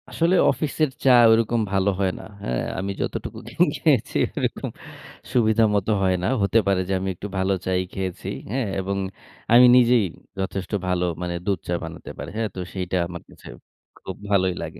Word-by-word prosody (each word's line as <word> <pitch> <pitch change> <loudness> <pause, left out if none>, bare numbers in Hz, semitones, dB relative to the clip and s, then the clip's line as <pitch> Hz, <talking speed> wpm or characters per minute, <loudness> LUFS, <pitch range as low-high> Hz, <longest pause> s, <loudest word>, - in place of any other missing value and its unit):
আসলে 170 +3 +2 0.2
অফিসের 155 0 -1
চা 135 - +4 0.2
ওইরকম 115 +1 +2
ভালো 95 0 +2
হয় 95 -2 +2
না, - - -10 0.2
হ্যাঁ? 60 -8 -1 0.2
আমি 100 +1 -2
যতটুকু - - -4
খে - - -14 0.2
খেয়েছি, - - +1 0.2
ওরকম - - -2 0.6
সুবিধা 115 -2 +3
মত 100 -1 0
হয় 95 -1 +2
না। - - +1
হতে 100 +3 +3
পারে 95 -1 +2
যে - - +1
আমি 95 +1 -2
একটু 100 - -7
ভালো 95 +1 +1
চাই 95 0 +1
খেয়েছি, 95 -2 -4 0.2
হ্যাঁ? 125 -2 -1
এবং 100 +1 -2 0.6
আমি 125 +1 +9
নিজেই 120 -3 +5 0.3
যথেষ্ট 95 0 -3 0.2
ভালো 90 -1 +1 0.2
মানে 90 -1 -3
দুধ 100 -4 0
চা 90 - -1
বানাতে 80 0 -8
পারি। - - -6
হ্যাঁ? 110 -1 -1
তো - - -5
সেইটা 90 -1 -2
আমার 85 -1 -8
কাছে - - -14 0.6
খুব 95 - -5
ভালোই 95 -2 +2
লাগে। - - -8
95 Hz, 180 wpm, -23 LUFS, 95-115 Hz, 0.6 s, আমি